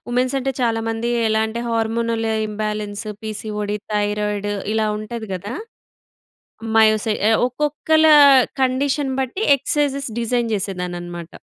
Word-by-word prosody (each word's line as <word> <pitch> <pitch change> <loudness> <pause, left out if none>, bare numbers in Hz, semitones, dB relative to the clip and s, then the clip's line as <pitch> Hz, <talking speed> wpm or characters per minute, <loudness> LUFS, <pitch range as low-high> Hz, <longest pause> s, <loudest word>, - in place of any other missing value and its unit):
Women's 250 +2 0
అంటే, 270 +1 -1
చాలా 230 -2 +1
మంది 225 +1 -2 0.2
ఎలా 220 0 +2
అంటే 230 +2 -5
హార్మోనల్ 230 0 -1 0.2
ఇంబాలెన్స్, 210 0 -4 0.2
పి‌సి‌‌ఓ‌డి, 210 -1 -4 0.2
థైరాయిడ్ 210 0 -1 0.2
ఇలా 220 -1 +1
ఉంటది 220 +1 -6
గదా! 200 +6 -6 1.2
మయోసై 215 0 +4
ఆహ్, 225 - +4
ఒక్కొక్కల 300 +4 +1 0.6
కండిషన్ 265 +1 0
బట్టి 265 - -3
ఎక్సైజ్‌స్ 280 -2 -1
డిజైన్ 235 0 0
చేసేదాన్నన్నమాట. 175 -3 -5
225 Hz, 110 wpm, -20 LUFS, 210-250 Hz, 1.2 s, మయోసై